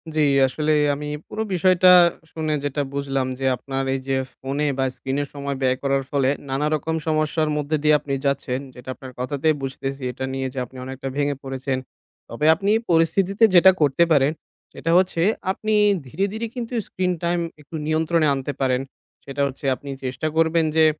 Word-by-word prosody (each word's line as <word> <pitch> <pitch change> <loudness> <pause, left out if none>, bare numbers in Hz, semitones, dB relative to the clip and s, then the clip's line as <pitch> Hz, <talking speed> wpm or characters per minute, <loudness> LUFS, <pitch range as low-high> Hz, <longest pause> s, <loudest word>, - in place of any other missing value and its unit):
জি, 155 - +3 0.3
আসলে 150 +4 -1 0.2
আমি 150 +1 -6 0.2
পুরো 220 - -3
বিষয়টা 185 +1 +4 0.4
শুনে 155 -1 -2
যেটা 145 +1 -1
বুঝলাম, 135 -2 -1
যে 135 - -2
আপনার 135 +1 -4
এইযে 135 0 -2 0.2
phone 135 +2 -4
এ - - +2
বা 135 - +1
screen 135 +1 -3
এ - - 0
সময় 140 -1 -4
ব্যয় 130 -1 +2
করার 135 -1 +1
ফলে 140 -2 +2 0.2
নানারকম 150 +3 -1
সমস্যার 155 0 +1
মধ্য 150 +1 0
দিয়ে 150 0 +5
আপনি 145 -1 -5
যাচ্ছেন। 140 -2 0 0.2
যেটা 125 0 -11
আপনার 130 -1 -10
কথাতেই 145 +4 0
বুঝতেছি 135 +1 -4
এটা 130 +2 -5
নিয়ে 135 0 -2
যে 135 - -4
আপনি 130 +2 -15
অনেকটা 135 +1 -6
ভেঙে 145 0 +1
পড়েছেন। 135 0 -3 0.5
তবে 115 +6 -2
আপনি 195 +4 -4
এই 225 - +1
পরিস্থিতিতে 190 +5 +2
যেটা 190 +2 +8
করতে 145 +3 +4
পারেন, 145 -2 +4 0.4
সেটা 165 - -2
হচ্ছে 180 -2 +2 0.3
আপনি 215 +3 -2 0.3
ধীরে, 175 +10 -1
ধীরে 225 +1 -3
কিন্তু 245 -1 -5
screen 180 -1 -1
time 170 0 +1 0.2
একটু 150 +3 -11
নিয়ন্ত্রণে 160 0 +2
আনতে 135 +1 -3
পারেন। 130 -1 +2 0.4
সেটা 140 +1 -4
হচ্ছে 140 +1 -8
আপনি 140 - -11
চেষ্টা 130 +3 -2
করবেন 165 0 +3
যে 160 0 +6
145 Hz, 175 wpm, -22 LUFS, 135-160 Hz, 0.5 s, যেটা